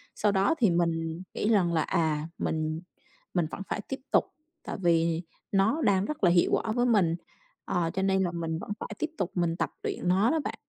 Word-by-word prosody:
Sau 210 -1 +2
đó 195 +10 +3
thì 220 - +5
mình 165 0 0
nghĩ 210 - 0
rằng 180 -6 +3
là 160 - +3
à, 155 -1 0
mình 155 +1 -1 0.5
mình 175 -3 +2
vẫn - - -6
phải 210 - -2
tiếp 270 - -3
tục. - - +4 0.4
Tại - - -5
vì 165 -1 +2 0.3
nó 215 +11 +2
đang 195 -3 +3
rất 305 - -5
là 175 - +7
hiệu 175 -1 +4
quả 220 - +1
với 245 +2 +2
mình. 190 -8 +3 0.5
Ờ, 170 -2 0
cho 190 - -1
nên 190 0 +2
là 175 - 0
mình 165 -1 -3
vẫn 205 - -7
phải - - -5
tiếp 315 - -1
tục 185 - -1
mình 170 -2 +1
tập - - 0
luyện - - -3
nó 195 +6 +4
đó 320 - +2
bạn. - - -3
175 Hz, 220 wpm, -28 LUFS, 165-205 Hz, 0.5 s, là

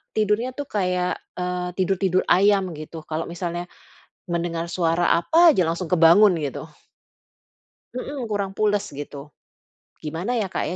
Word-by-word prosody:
tidurnya 215 +3 +1
itu 285 - -4
kayak, 180 -2 0 0.3
eee, 180 0 -2
tidur-tidur 185 -1 +1
ayam 200 +2 +4 0.2
gitu. 155 +2 -9
Kalau 160 +1 -2
misalnya 175 0 -4 0.7
mendengar 170 -1 -2
suara 170 -1 +1 0.2
apa 330 - +5
aja 225 - +1
langsung 170 +1 -3
kebangun 180 +4 +6
gitu. 145 -4 -4 1.3
Mhm, 265 +2 -5
kurang 200 -2 -1
pules 205 -1 +1
gitu. 145 0 -8 0.8
Gimana, 165 +8 -3
ya, 205 - -1
Kak, 185 - -3
ya, - - -3
180 Hz, 135 wpm, -23 LUFS, 170-205 Hz, 1.3 s, kebangun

